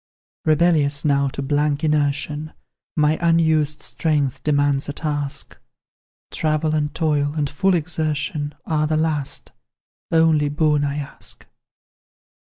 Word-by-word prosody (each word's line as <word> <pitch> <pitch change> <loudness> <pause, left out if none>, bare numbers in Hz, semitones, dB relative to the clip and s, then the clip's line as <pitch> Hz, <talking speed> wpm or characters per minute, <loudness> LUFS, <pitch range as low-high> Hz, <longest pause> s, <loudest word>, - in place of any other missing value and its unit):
"Rebellious 155 -3 +3
now 140 -1 +3
to 140 +1 -4
blank 145 +1 0
inertion, 150 0 0 0.4
My 150 0 +2
unused 160 -3 +2
strength 145 -4 -1
demands 145 -1 +1
a - - -3
task; 145 -2 -3 0.7
Travel, 155 0 0
and 150 -1 0
toil, 150 -2 +1
and 150 -2 0
full 180 +7 +1
exertion, 150 -2 -2
Are 155 -1 +1
the 155 0 +1
last, 150 -3 -2 0.6
only 160 -3 +4
boon 150 0 +2
I 140 0 -1
ask. 145 -1 -7
150 Hz, 115 wpm, -21 LUFS, 145-155 Hz, 0.7 s, only